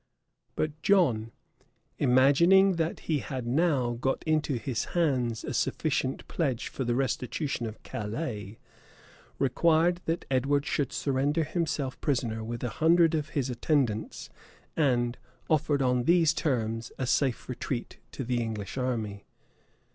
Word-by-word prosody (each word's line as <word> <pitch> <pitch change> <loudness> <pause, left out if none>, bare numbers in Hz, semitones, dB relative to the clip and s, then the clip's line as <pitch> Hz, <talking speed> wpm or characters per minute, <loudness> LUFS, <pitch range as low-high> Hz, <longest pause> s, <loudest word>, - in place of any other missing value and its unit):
But 155 0 -2
John, 130 - +3 0.7
imagining 170 +9 +5
that 165 0 -1
he 155 -3 0
had 130 -3 -5
now 130 -2 +1
got 135 0 0
into 155 -3 +1
his 120 +1 -2
hands 125 -8 +1
a 145 - -4
sufficient 135 +2 -1
pledge 130 -8 -1
for 135 - -4
the 120 -1 0
restitution 130 0 -2
of 110 - -9
Calais, 105 -2 -5 0.8
required 165 +6 +2
that 165 +1 -2
Edward 140 +2 +2
should 145 -3 -1
surrender 145 +4 0
himself 155 -5 -2
prisoner 120 -6 -1
with 115 +2 -5
a 125 - -1
hundred 165 0 +5
of 155 -1 -1
his 130 -2 0
attendants; 125 -4 -1 0.4
and 125 -5 +1 0.3
offered, 150 -2 +2
on 125 -1 +1
these 165 -2 +4
terms, 115 -7 -1
a 130 - -1
safe 130 0 0
retreat 125 -1 -4
to 135 - -4
the 120 0 -1
English 110 0 -4
army. 110 -6 -2
135 Hz, 130 wpm, -28 LUFS, 120-155 Hz, 0.8 s, imagining